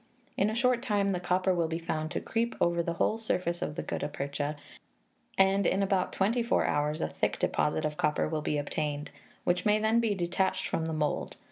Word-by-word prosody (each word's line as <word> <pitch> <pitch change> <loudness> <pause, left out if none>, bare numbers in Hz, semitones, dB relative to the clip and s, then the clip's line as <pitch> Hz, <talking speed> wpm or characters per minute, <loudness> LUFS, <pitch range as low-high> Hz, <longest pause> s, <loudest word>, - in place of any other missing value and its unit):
In 200 - +2
a 220 - -2
short 245 0 +2
time 205 -5 +1
the 185 -2 0
copper 185 +1 +1
will 170 -2 +1
be 160 0 -2
found 155 -2 -3
to - - -2
creep 235 +1 -1
over 170 0 +2
the 170 0 -2
whole 215 +6 +1
surface 180 -6 -1
of 150 - -3
the - - -3
gutta - - -2
percha, 145 +1 -3 0.8
and 195 +1 +4
in 195 +1 +2
about 190 -2 +1
twenty 220 +6 +1
four 235 - +2
hours 150 +1 0
a - - +1
thick - - -1
deposit 80 - 0
of 150 0 -2
copper 150 - +1
will 155 -1 -2
be 150 - -1
obtained, 145 0 -3 0.3
which 175 0 +1
may 210 0 +4
then 220 +2 +3
be 225 -3 +1
detached 185 +1 0
from 160 - -1
the 160 - -2
mould. 150 -1 -1
175 Hz, 215 wpm, -30 LUFS, 155-200 Hz, 0.8 s, and